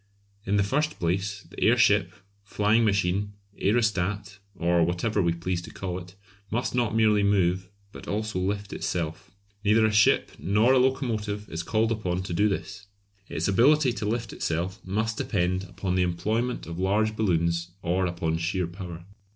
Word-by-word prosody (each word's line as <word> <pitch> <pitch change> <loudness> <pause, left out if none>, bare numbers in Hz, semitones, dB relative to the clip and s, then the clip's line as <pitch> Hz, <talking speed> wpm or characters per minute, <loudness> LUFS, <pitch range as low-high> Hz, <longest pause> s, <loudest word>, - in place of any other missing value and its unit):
In 100 - +2
the 100 - +3
first 150 +9 0
place, 95 +4 -1
the - - -12
airship, - - +4 0.3
flying 105 +3 +2
machine, 100 -1 +1 0.3
aerostat, 100 -2 0 0.2
or 85 -1 +2
whatever 90 +5 0
we 85 -2 +2
please 85 +1 -2
to - - -10
call 90 -2 -4
it, 90 +1 -13 0.3
must 120 +3 -1
not 120 -3 0
merely 110 -2 +4
move, 95 -2 +1 0.2
but - - -11
also 110 -2 -2
lift 100 +2 -2
itself. 80 -3 -3 0.3
Neither 110 +1 +4
a 110 - +2
ship 105 0 +4
nor 105 +7 +3
a 130 - +5
locomotive 110 -6 -1
is 80 - -3
called 110 +5 0
upon 95 -5 -1
to 90 - -5
do 105 +5 +3
this. 100 +1 -5 0.4
Its - - -2
ability 130 +7 +4
to 110 -3 -3
lift 115 0 -2
itself 85 +3 -2
must 110 +3 -2
depend 90 0 0
upon 95 -1 -4
either 90 - +1
the 90 -1 +2
employment 110 +8 -2
of 85 +1 -7
large 105 +3 +1
balloons 85 -4 0
or 90 +2 +1
upon 80 -2 -2
sheer 90 +2 -1
power. 85 -1 -8
100 Hz, 165 wpm, -26 LUFS, 90-110 Hz, 0.4 s, a